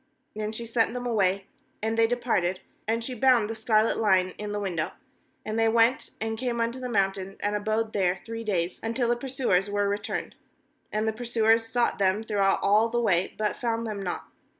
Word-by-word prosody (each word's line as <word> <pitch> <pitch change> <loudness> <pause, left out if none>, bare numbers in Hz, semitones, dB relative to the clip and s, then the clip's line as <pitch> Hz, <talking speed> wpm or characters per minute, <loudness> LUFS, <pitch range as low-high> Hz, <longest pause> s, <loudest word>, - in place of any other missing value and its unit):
And 215 0 -3
she 235 - -4
sent 230 0 +1
them 245 0 -4
away, 195 -4 +1 0.4
and 220 +1 0
they 225 0 +4
departed; 225 -7 0 0.3
and 230 +1 0
she 255 - -3
bound 245 -3 +4
the 225 - -3
scarlet 220 0 +2
line 190 -4 +3
in 210 0 -4
the 205 - -2
window. 180 -6 -2 0.5
^And 215 +1 -2
they 225 0 +4
went, 230 +2 +3
and 220 0 -3
came 245 -2 -1
unto 230 +2 -1
the 250 -1 -4
mountain, 195 -2 0
and 205 0 -1
abode 215 +1 -1
there 185 -2 +2
three 230 0 -5
days, 180 -5 -1
until 230 +2 0
the 240 - +3
pursuers 240 -7 0
were 205 0 +1
returned; 205 +1 -3 0.6
and 215 +1 0
the 220 - +1
pursuers 225 -1 +2
sought 240 -1 0
them 195 +2 +2
throughout 200 -3 +2
all 215 +3 +4
the 240 +1 0
way, 190 -6 +1
but 215 -1 0
found 230 -1 -1
them 210 -3 -4
not. 180 -2 -3
220 Hz, 195 wpm, -27 LUFS, 200-230 Hz, 0.6 s, they